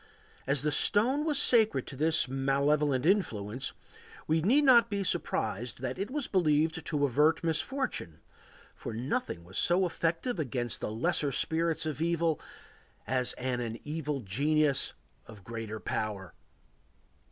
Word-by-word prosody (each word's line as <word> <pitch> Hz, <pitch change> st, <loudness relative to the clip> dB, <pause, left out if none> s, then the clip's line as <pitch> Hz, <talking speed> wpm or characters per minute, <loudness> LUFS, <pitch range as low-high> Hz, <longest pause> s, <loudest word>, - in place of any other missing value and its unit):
As 140 Hz, 0 st, +1 dB
the 150 Hz, -, +1 dB
stone 250 Hz, -, +4 dB
was 300 Hz, -3 st, +1 dB
sacred 220 Hz, -, +4 dB
to -, -, -9 dB
this 155 Hz, +2 st, +2 dB
malevolent 140 Hz, +1 st, +1 dB
influence, 130 Hz, -, 0 dB, 0.5 s
we 160 Hz, +1 st, +1 dB
need 255 Hz, -, +3 dB
not 240 Hz, -4 st, +6 dB
be 200 Hz, -1 st, -2 dB
surprised 120 Hz, -, -2 dB
that 130 Hz, -1 st, -4 dB
it 200 Hz, -, -3 dB
was 285 Hz, 0 st, -3 dB
believed 160 Hz, -2 st, +1 dB
to 145 Hz, -3 st, +1 dB
avert 150 Hz, +6 st, +2 dB
misfortune, 165 Hz, -, -2 dB, 0.5 s
for -, -, -7 dB
nothing 125 Hz, -, -3 dB
was 90 Hz, +2 st, -4 dB
so 180 Hz, +2 st, +3 dB
effective 170 Hz, +6 st, -2 dB
against 125 Hz, -5 st, -2 dB
the -, -, -3 dB
lesser 145 Hz, +6 st, 0 dB
spirits 165 Hz, +3 st, 0 dB
of 155 Hz, -1 st, -4 dB
evil 165 Hz, -2 st, 0 dB, 0.6 s
as 125 Hz, +1 st, +1 dB
an 120 Hz, -3 st, -3 dB
evil 150 Hz, -2 st, -3 dB
genius 140 Hz, +7 st, +1 dB, 0.3 s
of 105 Hz, -4 st, -13 dB
great 115 Hz, +1 st, -6 dB, 0.2 s
power. 100 Hz, -4 st, -3 dB
150 Hz, 135 wpm, -30 LUFS, 125-170 Hz, 0.6 s, not